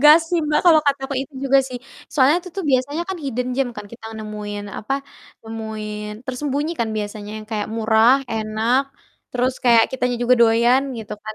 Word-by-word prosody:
Gas 300 Hz, +2 st, +9 dB
sih, 350 Hz, -, +2 dB
Mbak, 300 Hz, 0 st, +2 dB
kalo 325 Hz, -2 st, +8 dB
kataku 275 Hz, -1 st, 0 dB
itu 275 Hz, -, -12 dB
juga 275 Hz, 0 st, +5 dB
sih. 250 Hz, -1 st, -6 dB, 0.3 s
Soalnya 285 Hz, +2 st, +5 dB
itu 365 Hz, -, -10 dB
tuh 390 Hz, -, -2 dB
biasanya 275 Hz, +5 st, +1 dB
kan 380 Hz, -, -3 dB
hidden 250 Hz, -1 st, -2 dB
gem 270 Hz, -1 st, +1 dB
kan, 210 Hz, -1 st, -7 dB
kita 235 Hz, -1 st, -12 dB
nemuin 210 Hz, -1 st, -6 dB
apa, 215 Hz, -, -4 dB, 0.5 s
nemuin 220 Hz, -1 st, -6 dB, 0.2 s
tersembunyi 285 Hz, +4 st, -2 dB
kan 230 Hz, -, +1 dB
biasanya 210 Hz, 0 st, -5 dB
yang 215 Hz, -, -10 dB
kayak 210 Hz, -2 st, -2 dB
murah, 220 Hz, +2 st, +5 dB, 0.2 s
enak, 220 Hz, +4 st, +1 dB, 0.5 s
terus 250 Hz, +1 st, 0 dB
kayak 235 Hz, -2 st, +6 dB
kitanya 250 Hz, -1 st, -1 dB
juga 250 Hz, +1 st, +5 dB
doyan 235 Hz, +3 st, +5 dB, 0.2 s
gitu 220 Hz, -1 st, -7 dB
kan. 215 Hz, 0 st, -5 dB
245 Hz, 180 wpm, -21 LUFS, 220-275 Hz, 0.5 s, Gas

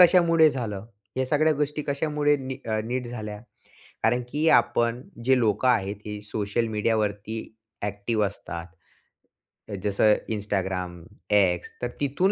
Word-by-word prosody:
कशामुळे 170 Hz, -3 st, +7 dB
झालं? 110 Hz, -6 st, -4 dB, 0.3 s
या 130 Hz, -, +2 dB
सगळ्या 155 Hz, +3 st, +3 dB
गोष्टी 150 Hz, +1 st, -1 dB
कशामुळे 145 Hz, 0 st, +2 dB
नी 130 Hz, -1 st, -5 dB, 0.3 s
नीट 125 Hz, +1 st, -2 dB
झाल्या? 105 Hz, -3 st, -5 dB, 0.7 s
कारण 125 Hz, -, +3 dB
की 150 Hz, +2 st, +1 dB
आपण 120 Hz, -1 st, +3 dB, 0.2 s
जे 130 Hz, 0 st, +5 dB
लोकं 115 Hz, +2 st, +2 dB
आहेत, 105 Hz, -5 st, +2 dB
ते 105 Hz, -1 st, -5 dB
सोशल 105 Hz, +2 st, -1 dB
मीडियावरती 110 Hz, 0 st, 0 dB, 0.4 s
ॲक्टिव्ह 105 Hz, +2 st, 0 dB
असतात. 90 Hz, -3 st, -6 dB, 1.2 s
जसं 105 Hz, +1 st, +4 dB, 0.2 s
Instagram, 95 Hz, -4 st, -2 dB, 0.4 s
X, 95 Hz, -4 st, +3 dB
तर 120 Hz, -, 0 dB
तिथून 145 Hz, +8 st, +2 dB
115 Hz, 120 wpm, -26 LUFS, 105-140 Hz, 1.2 s, कशामुळे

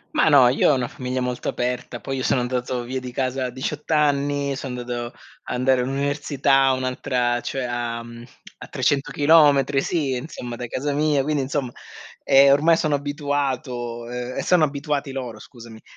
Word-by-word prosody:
Ma -, -, +4 dB
no, 135 Hz, -4 st, +7 dB
io 130 Hz, +4 st, +3 dB
ho -, -, +3 dB
una 125 Hz, -2 st, -1 dB
famiglia 125 Hz, 0 st, -4 dB
molto 125 Hz, -1 st, -2 dB
aperta, 125 Hz, -1 st, -3 dB
poi 135 Hz, -, -4 dB
io 130 Hz, -, -3 dB
sono 125 Hz, -, +2 dB
andato 125 Hz, 0 st, -2 dB
via 130 Hz, +1 st, -4 dB
di 125 Hz, -, -7 dB
casa 130 Hz, 0 st, -2 dB
a -, -, -2 dB
18 140 Hz, +5 st, -5 dB
anni, 145 Hz, -2 st, +1 dB
sono 130 Hz, -2 st, -5 dB
andato 120 Hz, 0 st, -5 dB, 0.3 s
andare 130 Hz, 0 st, +1 dB
all'università, 135 Hz, 0 st, +1 dB
un'altra, 125 Hz, -2 st, -1 dB
cioè 135 Hz, -1 st, -3 dB
a 120 Hz, -1 st, -3 dB, 0.7 s
300 135 Hz, +1 st, 0 dB
chilometri 145 Hz, -3 st, +4 dB
sì, 145 Hz, -7 st, -1 dB
insomma, 125 Hz, -3 st, -6 dB
da 120 Hz, 0 st, -6 dB
casa 140 Hz, +4 st, -2 dB
mia, 150 Hz, -1 st, +2 dB
quindi, 150 Hz, 0 st, 0 dB
insomma, 135 Hz, -1 st, -2 dB, 0.5 s
eh, 140 Hz, +1 st, +6 dB
ormai 160 Hz, +4 st, +4 dB
sono 150 Hz, -3 st, +1 dB
abituato 140 Hz, -5 st, -3 dB
e 125 Hz, +1 st, -4 dB
sono 180 Hz, -3 st, +3 dB
abituati 145 Hz, -1 st, -2 dB
loro, 125 Hz, -4 st, -6 dB
scusami, 115 Hz, -1 st, -13 dB
130 Hz, 160 wpm, -22 LUFS, 125-145 Hz, 0.7 s, no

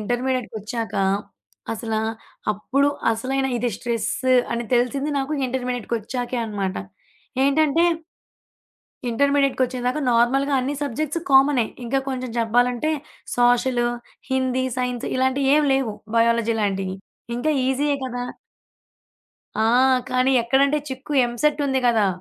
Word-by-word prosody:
ఇంటర్మీడియేట్‌కొచ్చాక. 240 Hz, -1 st, -2 dB, 0.8 s
అసలా 225 Hz, -1 st, -2 dB, 0.5 s
అప్పుడు 275 Hz, +7 st, +1 dB, 0.2 s
అసలైనా 265 Hz, +4 st, -1 dB
ఇది 240 Hz, +1 st, 0 dB
స్ట్రెస్ 235 Hz, -3 st, -2 dB, 0.4 s
అని 235 Hz, 0 st, -2 dB
తెలిసింది 270 Hz, +5 st, +1 dB
నాకు 275 Hz, +3 st, -2 dB
ఇంటర్మీడియట్‌కొచ్చాకే 245 Hz, -1 st, -3 dB
అనమాట. 200 Hz, -3 st, -3 dB, 0.7 s
ఏంటంటే 310 Hz, +3 st, +3 dB, 1.3 s
ఇంటర్మీడియేట్‌కొచ్చేదాకా 260 Hz, 0 st, +1 dB
నార్మల్‌గా 270 Hz, +4 st, +3 dB
అన్ని 275 Hz, +3 st, -2 dB
సబ్జెక్ట్స్ 300 Hz, +4 st, -2 dB
కామనే. 270 Hz, -3 st, +5 dB, 0.2 s
ఇంకా 270 Hz, +3 st, 0 dB
కొంచెం 255 Hz, -2 st, -3 dB
జెప్పాలంటే 245 Hz, +5 st, +2 dB, 0.5 s
సోషలు, 245 Hz, 0 st, +3 dB, 0.4 s
హిందీ, 260 Hz, 0 st, +1 dB
సైన్స్ 250 Hz, -1 st, -2 dB
ఇలాంటియి 260 Hz, +1 st, +1 dB
ఏమి 295 Hz, -2 st, +3 dB
లేవు 245 Hz, -6 st, -1 dB, 0.2 s
బయాలజీ 230 Hz, 0 st, +3 dB
లాంటియి. 190 Hz, -2 st, -1 dB, 0.4 s
ఇంక 255 Hz, +6 st, -1 dB, 0.2 s
ఈజీయే 285 Hz, +2 st, +1 dB
కదా! 245 Hz, -1 st, -4 dB, 1.3 s
ఆ! 220 Hz, -, +1 dB, 0.5 s
కానీ 255 Hz, +1 st, +2 dB
ఎక్కడంటే 275 Hz, +5 st, +3 dB
చిక్కు 265 Hz, +3 st, -6 dB
ఎంసెట్ 290 Hz, +5 st, 0 dB
ఉంది 265 Hz, -1 st, +1 dB
కదా, 220 Hz, -4 st, +3 dB
250 Hz, 105 wpm, -23 LUFS, 235-270 Hz, 1.3 s, కామనే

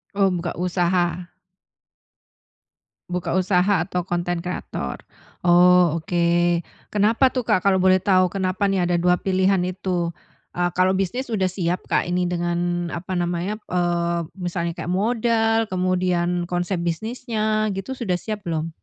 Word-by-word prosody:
Oh, 200 Hz, -1 st, +3 dB
buka 175 Hz, -1 st, -3 dB
usaha. 175 Hz, 0 st, 0 dB, 1.8 s
Buka 180 Hz, -1 st, -2 dB
usaha 185 Hz, 0 st, +2 dB
atau 180 Hz, 0 st, -3 dB
konten 175 Hz, -1 st, -1 dB
kreator. 180 Hz, +2 st, -5 dB, 0.4 s
Oh, 175 Hz, -1 st, +5 dB
oke. 170 Hz, +1 st, +1 dB, 0.3 s
Kenapa 225 Hz, +5 st, +3 dB
tuh 255 Hz, -, 0 dB
Kak 195 Hz, -4 st, +1 dB
kalau 190 Hz, -2 st, +4 dB
boleh 185 Hz, 0 st, +5 dB
tahu? 185 Hz, -1 st, +3 dB
Kenapa 190 Hz, +1 st, -1 dB
nih 190 Hz, -2 st, +1 dB
ada 175 Hz, -1 st, +1 dB
dua 180 Hz, 0 st, +3 dB
pilihan 190 Hz, +1 st, +2 dB
itu? 180 Hz, -2 st, -2 dB, 0.4 s
Eee, 175 Hz, 0 st, 0 dB
kalau 185 Hz, +1 st, +4 dB
bisnis 195 Hz, +7 st, -1 dB
udah 190 Hz, -3 st, +1 dB
siap 180 Hz, -1 st, -2 dB
Kak -, -, +2 dB
ini 180 Hz, 0 st, 0 dB
dengan 175 Hz, 0 st, -1 dB
apa 180 Hz, +2 st, -4 dB
namanya, 175 Hz, +4 st, -2 dB
eee, 170 Hz, -2 st, -1 dB
misalnya 175 Hz, -1 st, -3 dB
kayak 175 Hz, +2 st, -3 dB
modal, 225 Hz, +2 st, +1 dB
kemudian 180 Hz, -2 st, 0 dB
konsep 175 Hz, +1 st, -2 dB
bisnisnya, 215 Hz, +3 st, -1 dB
gitu, 195 Hz, +8 st, -5 dB
sudah 210 Hz, -8 st, -1 dB
siap 210 Hz, +1 st, -6 dB
belum? 165 Hz, -1 st, -2 dB
180 Hz, 135 wpm, -22 LUFS, 175-195 Hz, 1.8 s, Oh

